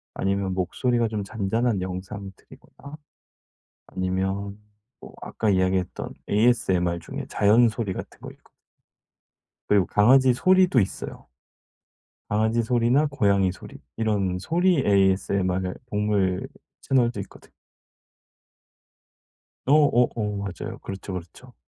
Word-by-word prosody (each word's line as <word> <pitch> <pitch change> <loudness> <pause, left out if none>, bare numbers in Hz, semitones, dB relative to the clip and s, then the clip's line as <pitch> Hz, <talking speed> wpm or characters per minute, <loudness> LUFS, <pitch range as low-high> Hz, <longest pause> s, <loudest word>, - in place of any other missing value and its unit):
아니면 100 0 -1
목소리가 115 +6 0
좀 105 -2 -3
잔잔한 110 +1 -1
영상들이거나 95 +9 -9 0.9
아니면 95 +2 -3 0.4
뭐 - - -12
아까 110 - -1
이야기했던 95 -1 -1 0.2
ASMR 95 -6 +2
중에 80 - -7
자연 115 +4 +4
소리 110 -2 -3
같은 - - -8
거 - - -8
있고 - - -20 1.2
그리고 100 -3 +3
강아지 130 +5 +5
소리도 185 -1 +4
있어요. 95 - -5 1.0
강아지 110 +2 +1
소리나 120 +5 +2
고양이 100 -8 +2
소리 90 - -12 0.2
이런 100 -5 0
소리 175 - +1
ASMR 95 -3 +1 0.2
동물 105 -3 0 0.3
채널도 120 -4 +1
있거든 100 - -12 2.2
어어어 125 -7 +2
맞아요. 100 -3 -6
그렇죠, 95 0 -7
그렇죠. 90 -2 -10
100 Hz, 260 characters per minute, -24 LUFS, 95-120 Hz, 2.2 s, 강아지